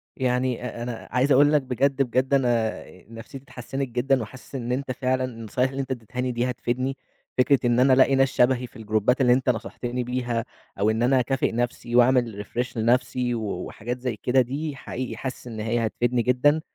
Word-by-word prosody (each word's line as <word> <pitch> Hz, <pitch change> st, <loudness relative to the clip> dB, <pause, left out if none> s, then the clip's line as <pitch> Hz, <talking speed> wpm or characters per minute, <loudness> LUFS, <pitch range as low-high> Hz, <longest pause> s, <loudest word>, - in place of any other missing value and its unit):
يعني 125 Hz, -1 st, 0 dB
أ 120 Hz, -1 st, -5 dB
أنا 120 Hz, -1 st, -6 dB
عايز 130 Hz, +3 st, +2 dB
أقول 145 Hz, +3 st, +5 dB
لك 150 Hz, -, +4 dB
بجد، 135 Hz, +2 st, 0 dB
بجد 130 Hz, +1 st, +1 dB
أنا 120 Hz, -5 st, +1 dB, 0.3 s
نفسيتي 115 Hz, +4 st, -10 dB
اتحسنت 135 Hz, +1 st, -5 dB
جدًا، 125 Hz, +2 st, +1 dB
وحاسس 130 Hz, +5 st, -10 dB
إن 125 Hz, -2 st, -3 dB
أنت 130 Hz, +1 st, -2 dB
فعلًا 130 Hz, 0 st, 0 dB
النصايح 125 Hz, +1 st, -2 dB
اللي 135 Hz, +1 st, -3 dB
أنت 135 Hz, -1 st, -6 dB
ادّيتهاني 125 Hz, +1 st, -3 dB
دي 120 Hz, +1 st, -1 dB
هتفيدني. 130 Hz, +2 st, -2 dB, 0.4 s
فكرة 130 Hz, +1 st, +4 dB
إن 120 Hz, 0 st, +3 dB
أنا 130 Hz, +1 st, +5 dB
ألاقي 135 Hz, +1 st, +5 dB
ناس 135 Hz, 0 st, +4 dB
شبهي 125 Hz, 0 st, +2 dB
في -, -, -26 dB
الجروبات 110 Hz, +3 st, +1 dB
اللي 125 Hz, -1 st, +5 dB
أنت 130 Hz, +1 st, +1 dB
نصحتني 120 Hz, +1 st, -2 dB
بيها، 120 Hz, -1 st, -2 dB, 0.3 s
أو 105 Hz, +2 st, +3 dB
إن 110 Hz, +2 st, +1 dB
أنا 130 Hz, +2 st, +4 dB
أكافئ 135 Hz, +2 st, 0 dB
نَفْسي، 120 Hz, 0 st, -2 dB
وأعمل 120 Hz, -4 st, +3 dB
refresh 125 Hz, +2 st, -4 dB
لنَفْسي، 125 Hz, +2 st, +1 dB
و 115 Hz, -, -3 dB, 0.2 s
وحاجات 120 Hz, +3 st, -5 dB
زَي 125 Hz, -2 st, -3 dB
كده 130 Hz, +1 st, +4 dB
دي 140 Hz, +4 st, -3 dB
حقيقي 130 Hz, -1 st, -5 dB
حاسس 130 Hz, -1 st, -6 dB
إن 115 Hz, -2 st, -7 dB
هي 115 Hz, +2 st, 0 dB
هتفيدني 120 Hz, +2 st, 0 dB
جدًا. 130 Hz, +6 st, +3 dB
125 Hz, 190 wpm, -25 LUFS, 120-130 Hz, 0.4 s, أقول